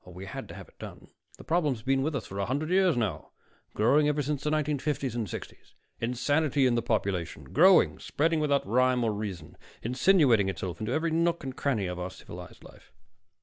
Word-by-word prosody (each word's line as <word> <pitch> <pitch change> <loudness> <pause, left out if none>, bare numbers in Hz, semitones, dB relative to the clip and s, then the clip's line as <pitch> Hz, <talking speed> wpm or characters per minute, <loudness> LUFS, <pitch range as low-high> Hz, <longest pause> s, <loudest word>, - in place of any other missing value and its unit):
Oh, - - -14
we 90 +2 -9
had 95 - -7
to - - -10
have - - -10
it - - -25
done - - -10 0.3
the - - -12
problem's 150 -9 0
been 135 +1 +1
with 150 +2 -1
us 130 - -3
for 100 - -7
a 100 - -1
hundred 145 +6 -2
years 185 -5 +3
now, 95 -10 -3 0.4
growing 140 +8 +4
ever 150 0 +1
since 145 0 -3
the 150 - 0
1950s 150 -3 -1
and 115 -3 -2
60s - - -9 0.3
insanity 140 +4 +1
in 125 - +3
the 120 - +1
population, 100 -7 -2
growing, 185 +4 +5
spreading 160 +2 0
without 145 -2 +1
rhyme 125 +3 +2
or 110 -2 +1
reason, 100 -7 -6 0.3
insinuating 125 - +3
itself 90 -3 -5
into 110 +2 -3
every 160 +4 0
nook 170 +1 +1
and 130 -1 -5
cranny 130 -8 0
of 90 0 -4
our 90 +1 -3
civilized 90 -2 -11
life." - - -17
130 Hz, 200 wpm, -28 LUFS, 105-150 Hz, 0.4 s, growing